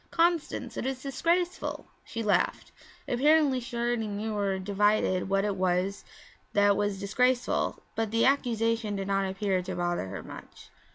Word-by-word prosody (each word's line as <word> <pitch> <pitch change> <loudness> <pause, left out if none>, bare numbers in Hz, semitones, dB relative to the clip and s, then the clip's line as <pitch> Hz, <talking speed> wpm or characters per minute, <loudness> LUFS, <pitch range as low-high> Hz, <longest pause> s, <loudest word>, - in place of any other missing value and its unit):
'Constance, 330 -8 0
it - - -3
is 265 -1 -4
disgraceful!' 340 +6 -1 0.2
She 230 0 -5
laughed. 200 -4 +1 0.4
Apparently 285 +1 +3
she 240 0 -7
already 235 -2 0
knew 210 +1 -3
or 200 -2 0
divined 200 -1 +1
what 195 +1 +2
it 205 -2 -1
was 185 +1 0 0.5
that 205 0 +4
was 205 -1 -1
disgraceful, 250 +5 0
but 225 -1 -1
the 230 +2 +2
accusation 230 -5 +1
did 195 -1 -3
not 195 -1 +1
appear 190 -1 0
to 185 +1 -5
bother 175 - -1
her 95 +1 -6
much. - - -12
210 Hz, 155 wpm, -28 LUFS, 195-250 Hz, 0.5 s, that